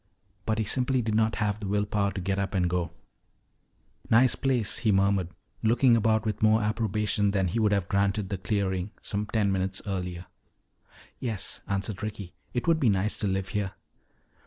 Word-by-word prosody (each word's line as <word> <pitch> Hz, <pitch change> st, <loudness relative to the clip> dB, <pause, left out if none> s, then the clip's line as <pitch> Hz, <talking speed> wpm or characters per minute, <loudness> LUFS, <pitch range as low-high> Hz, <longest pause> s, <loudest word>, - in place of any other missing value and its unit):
But 110 Hz, 0 st, +1 dB
he 110 Hz, -, +1 dB
simply 125 Hz, +3 st, +1 dB
did 110 Hz, -1 st, -1 dB
not 110 Hz, 0 st, +2 dB
have 105 Hz, -1 st, -1 dB
the 105 Hz, -, -5 dB
will 105 Hz, +1 st, +1 dB
power 100 Hz, -1 st, 0 dB
to -, -, -4 dB
get 95 Hz, +2 st, -1 dB
up 100 Hz, 0 st, -2 dB
and 90 Hz, -2 st, +2 dB
go. 85 Hz, -1 st, -1 dB, 1.2 s
"Nice 120 Hz, +3 st, +5 dB
place," 125 Hz, -6 st, 0 dB
he 110 Hz, -3 st, +2 dB
murmured, 95 Hz, -2 st, +2 dB, 0.3 s
looking 120 Hz, +2 st, +4 dB
about 110 Hz, 0 st, +2 dB
with 105 Hz, -2 st, -2 dB
more 110 Hz, 0 st, +4 dB
approbation 105 Hz, -1 st, 0 dB
than 95 Hz, -2 st, +1 dB
he 115 Hz, -, -1 dB
would 105 Hz, -2 st, +3 dB
have 100 Hz, -3 st, +1 dB
granted 100 Hz, 0 st, 0 dB
the 95 Hz, -, -3 dB
clearing 95 Hz, 0 st, -1 dB
some 105 Hz, +1 st, -2 dB
ten 105 Hz, -2 st, +1 dB
minutes 95 Hz, 0 st, -1 dB
earlier. 90 Hz, -3 st, -4 dB, 0.9 s
"Yes," 110 Hz, -6 st, -4 dB
answered 100 Hz, 0 st, -2 dB
Ricky. 100 Hz, -4 st, -5 dB, 0.2 s
"It 120 Hz, -, -3 dB
would 165 Hz, -1 st, +4 dB
be 130 Hz, -, +3 dB
nice 100 Hz, +1 st, +1 dB
to 105 Hz, -, -1 dB
live 95 Hz, +1 st, -1 dB
here." 105 Hz, -4 st, -2 dB
105 Hz, 185 wpm, -27 LUFS, 95-110 Hz, 1.2 s, Nice